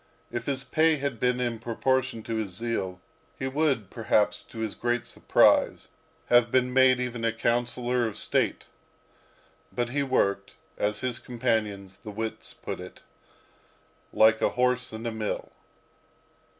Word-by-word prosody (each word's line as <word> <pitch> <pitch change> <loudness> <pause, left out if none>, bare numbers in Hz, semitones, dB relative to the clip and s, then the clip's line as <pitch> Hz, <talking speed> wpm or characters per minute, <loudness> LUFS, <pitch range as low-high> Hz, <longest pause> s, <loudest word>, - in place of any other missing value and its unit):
If 120 0 -4
his 135 -1 0
pay 155 +4 +3
had 140 -5 -3
been 125 +1 +1
in 120 -2 -1
proportion 125 +1 0
to 115 0 -3
his 110 -3 -2
zeal, 95 -5 -2 0.4
he 130 - -2
would, 135 -7 0
perhaps, 105 -2 +1
to - - -15
his 110 -2 -2
great 120 0 -1
surprise, - - +3 0.4
have 120 -1 +4
been 125 -1 +2
made 130 -1 +5
even 125 -2 -3
a 115 - +2
councillor 120 +1 0
of 105 - -6
state. - - 0 1.1
But 120 -1 -1
he 140 +3 0
worked, 100 -7 0 0.2
as 105 +1 -1
his 125 -2 -2
companions, 110 -6 -2
the 110 - -10
wits, 110 +2 -5
put - - -6
it, - - -11 1.1
like 110 0 +5
a - - +3
horse 125 0 +1
in 110 +1 -7
a 115 - -1
mill. 110 -1 -4
120 Hz, 150 wpm, -27 LUFS, 110-125 Hz, 1.1 s, made